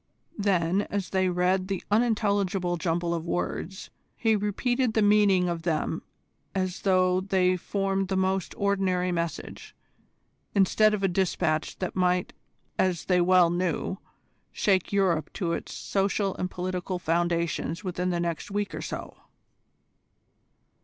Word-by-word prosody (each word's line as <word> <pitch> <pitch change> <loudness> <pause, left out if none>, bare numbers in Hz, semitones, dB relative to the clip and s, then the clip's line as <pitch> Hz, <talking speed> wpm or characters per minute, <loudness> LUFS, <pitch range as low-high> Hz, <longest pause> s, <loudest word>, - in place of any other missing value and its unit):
Then 190 -1 +1
as 200 -3 -3
they 185 -1 +2
read 180 +1 +1
the 195 -1 -3
unintelligible 200 -5 +1
jumble 170 +1 -1
of 170 0 -4
words, 185 +2 -3 0.3
he 225 -2 +2
repeated 225 +4 0
the 220 - +4
meaning 205 -3 +4
of 170 -1 -2
them 165 -1 -1 0.5
as 185 -1 -2
though 185 -1 +3
they 185 -1 +2
formed 195 +1 -1
the 190 0 -1
most 190 0 0
ordinary 190 -3 +1
message, 170 -1 -4 0.8
instead 210 +2 +4
of 200 - -5
a - - +4
dispatch 175 -4 0
that 185 - -4
might, 180 -1 +1 0.5
as 185 -3 +1
they 180 -1 +3
well 180 -1 +5
knew, 180 +1 -1 0.5
shake 190 -3 +1
Europe 185 -6 +1
to 170 -4 -1
its - - -5
social 195 0 0
and 180 - -2
political 180 0 -3
foundations 170 0 -1
within 180 -1 -2
the 175 -1 0
next 170 +1 -3
week 205 0 -2
or - - -4
so. - - -6
185 Hz, 135 wpm, -27 LUFS, 175-195 Hz, 0.8 s, well